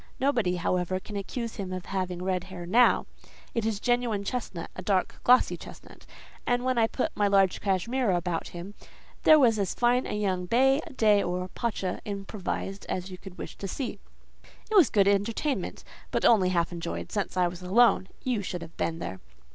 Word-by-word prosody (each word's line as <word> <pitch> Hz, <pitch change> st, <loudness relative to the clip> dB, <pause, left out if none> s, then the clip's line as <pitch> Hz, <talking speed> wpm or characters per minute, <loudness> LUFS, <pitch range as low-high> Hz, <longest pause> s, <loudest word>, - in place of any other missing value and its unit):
Nobody, 235 Hz, -10 st, +1 dB
however, 180 Hz, +1 st, 0 dB
can 205 Hz, +2 st, -10 dB
accuse 230 Hz, +4 st, -4 dB
him 195 Hz, -3 st, -4 dB
of 185 Hz, -1 st, -5 dB
having 185 Hz, -2 st, -3 dB
red 185 Hz, -1 st, -1 dB
hair 185 Hz, -2 st, -8 dB
now—it 230 Hz, +1 st, +1 dB
is 215 Hz, -3 st, -1 dB
genuine 240 Hz, -3 st, 0 dB
chestnut—a 195 Hz, -6 st, -5 dB
dark, 185 Hz, 0 st, 0 dB
glossy 250 Hz, +1 st, +5 dB
chestnut; -, -, -13 dB, 0.4 s
and 245 Hz, +1 st, +1 dB
when 255 Hz, -2 st, +2 dB
I 225 Hz, -, +4 dB
put 290 Hz, +7 st, -2 dB
my 205 Hz, -, +2 dB
large 195 Hz, -2 st, +3 dB
cashmere 225 Hz, +6 st, 0 dB
about 175 Hz, -2 st, -1 dB
him, 175 Hz, +4 st, -8 dB, 0.5 s
there 310 Hz, -, +9 dB
was 235 Hz, -7 st, +4 dB
as 195 Hz, -3 st, -1 dB
fine 245 Hz, +1 st, +2 dB
a -, -, -4 dB
young 185 Hz, -3 st, -1 dB
bey, 270 Hz, -, +4 dB, 0.2 s
dey, 210 Hz, -2 st, +5 dB
or 180 Hz, 0 st, -2 dB
pacha 195 Hz, -5 st, -3 dB
improvised 195 Hz, -1 st, -5 dB
as 185 Hz, +1 st, -3 dB
you 180 Hz, -, -8 dB
would 190 Hz, -2 st, -10 dB
wish -, -, -7 dB
to 195 Hz, -, -5 dB
see. 255 Hz, +6 st, -4 dB, 0.7 s
"It -, -, +1 dB
was 355 Hz, -, +7 dB
good 200 Hz, -2 st, +3 dB
entertainment; 220 Hz, +8 st, 0 dB, 0.3 s
but -, -, 0 dB
only 195 Hz, -6 st, +5 dB
half 170 Hz, -2 st, +1 dB
enjoyed, 170 Hz, -1 st, -5 dB
since 205 Hz, -2 st, -2 dB
I 180 Hz, -1 st, +4 dB
was 175 Hz, +1 st, -7 dB
alone: 195 Hz, +1 st, +4 dB, 0.2 s
you 245 Hz, -5 st, 0 dB
should 180 Hz, -3 st, -5 dB
have 165 Hz, 0 st, -12 dB
been 165 Hz, -, -1 dB
there. 95 Hz, -, -6 dB
200 Hz, 180 wpm, -28 LUFS, 180-235 Hz, 0.7 s, there